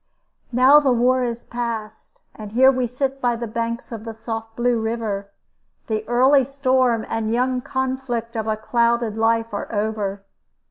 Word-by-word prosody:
Now 260 +4 +7
the 280 -3 +2
war 250 +2 +3
is 235 -1 -3
past, 225 -3 -5 0.2
and 210 -1 -9
here 260 +3 +6
we 255 -2 -1
sit 270 +3 -3
by 245 -1 +1
the 235 0 -4
banks 230 +2 -4
of 225 -2 -6
the 225 -1 -7
soft 225 0 -6
Blue 240 0 +1
River. 220 -3 -3 0.6
The 215 -1 -2
early 260 +3 +4
storm 255 -3 +1
and 225 -1 -2
young 250 +2 +1
conflict 260 -3 -3
of 220 -1 -2
a 215 -1 0
clouded 235 0 +1
life 225 0 +1
are 205 - -4
over. 205 -2 -2
235 Hz, 165 wpm, -22 LUFS, 220-255 Hz, 0.6 s, Now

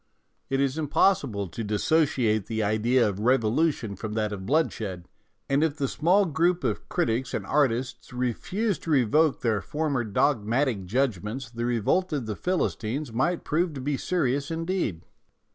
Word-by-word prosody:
It 135 - 0
is 140 +2 0
impossible 140 - +1
to 115 - -5
dissociate 110 -1 +1
the 110 -1 -1
idea 110 +4 +2
of 100 -1 -3
revolution 120 0 +1
from 105 +3 -5
that 105 -1 -1
of 95 -2 -6
bloodshed, 110 - -1 0.4
and 140 +2 +2
if 160 -2 0
the 140 -2 0
small 180 +9 +3
group 170 +2 +1
of - - -2
critics 130 -7 0
and - - -3
artists 130 -3 0
refused 175 - -2
to - - -5
revoke 150 +2 +3
their 110 -4 +1
former 145 0 -1
dogmatic 115 0 +1
judgments 120 +1 -1
the 120 0 -3
revolt 125 - +1
of 140 -5 -2
the 110 -1 -3
Philistines 140 - -2
might 165 +9 0
prove 165 +2 0
to 140 - -6
be 140 +2 -1
serious 140 -3 -1
indeed. 165 - -2
130 Hz, 155 wpm, -26 LUFS, 110-155 Hz, 0.4 s, small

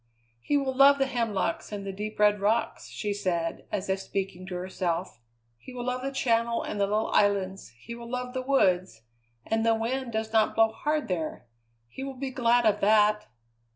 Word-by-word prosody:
"He 290 - +1
will 270 -2 -1
love 275 +2 +7
the 270 - +2
hemlocks 225 -10 -2
and 200 -1 -5
the 195 - -3
deep 210 +2 -5
red 210 0 +4
rocks," 215 +4 0
she 210 -2 -3
said, 170 -4 -2
as 200 -1 -2
if 190 0 0
speaking 190 -1 -4
to 185 - -5
herself; 180 -4 -3 0.4
"he 250 - -12
will 245 -1 -4
love 250 0 -2
the 270 +1 -3
Channel 235 -3 +1
and 205 - -4
the 200 - +3
little 215 +2 0
islands, 195 -2 +1
he 235 - -9
will 235 0 -9
love 250 0 -4
the 260 - -2
woods 185 - +1 0.4
and 225 0 0
the 225 0 +3
wind 240 +3 -2
does 220 0 -3
not 220 -1 +3
blow 225 0 +5
hard 300 +6 -1
there 165 -8 -3 0.4
he 265 - -8
will 270 -1 -6
be 265 0 -4
glad 245 -2 +3
of 210 -1 +2
that." 210 0 +4
220 Hz, 195 wpm, -27 LUFS, 195-250 Hz, 0.4 s, love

